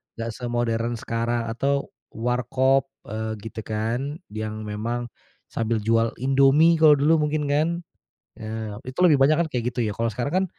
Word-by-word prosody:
nggak 115 0 -4
semodern 120 -1 -1
sekarang 115 0 -2
atau 140 +4 0 0.3
warkop, 130 +3 +1 0.2
eee, 110 +1 -3
gitu, 110 0 -7
kan, 120 +8 -3
yang 110 0 -5
memang, 115 +3 -3 0.4
sambil 115 -1 -1
jual 115 +1 +2
Indomie 135 +5 +5
kalau 155 -2 +7
dulu 150 +2 +3
mungkin, 150 0 -1
kan. 150 +3 +3 0.7
Ya, 110 -1 -5
itu 130 +6 -6
lebih 155 -6 +6
banyak, 140 +3 +5
kan, 170 - +1
kayak 125 0 -1
gitu, - - -5
ya. 105 - -1
Kalau 115 0 0
sekarang, 125 +8 -3
kan, - - 0
120 Hz, 160 wpm, -24 LUFS, 110-140 Hz, 0.7 s, kalau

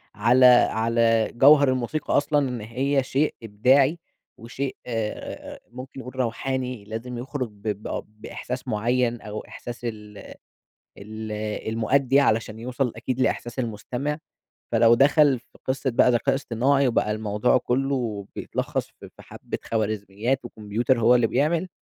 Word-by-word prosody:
على 120 +5 +4
على 115 -2 +4
جَوهر 140 +1 +6
الموسيقى 130 +5 -1
أصلًا، 145 -2 +1
إن 120 -3 -5
هي 130 +5 0
شيء 140 +3 0
إبداعي 130 +9 +3 0.4
وشيء 130 +4 -5
آآ، 115 -3 -5
ممكن 130 +2 -9
نقول 125 +1 -9
روحاني، 125 -2 -2
لازم 115 +3 -6
يخرج 130 -1 -4
ب 100 -1 -22
ب 105 0 -3
بإحساس 115 +4 -7
معيّن 120 +1 0
أو 105 0 -6
إحساس 120 0 -8
ال 105 -2 -7 0.8
ال 110 +1 -7 0.4
المؤدّي 130 +5 +2
علشان 110 -4 +1
يوصل 125 +1 -2
أكيد 130 0 -3
لإحساس 120 -1 -1
المستمع. 125 +5 -3 0.5
فلو 115 0 +6
دخل 140 0 +4
في 125 - -23
قصة 130 0 -1
بقى 120 +1 +4
ذكاء 130 +3 +2
إصطناعي 135 +1 +1
وبقى 110 -2 +1
الموضوع 105 +3 +1
كلّه 125 -5 -1
بيتلخّص - - -3
في - - -10
في - - -13
حَبة - - -7
خوارزميات 110 +3 -2
وكمبيوتر 115 +3 -1
هو 115 +2 +5
اللي 120 -2 +4
بيعمل، 160 +9 0
120 Hz, 135 wpm, -24 LUFS, 110-135 Hz, 0.8 s, جَوهر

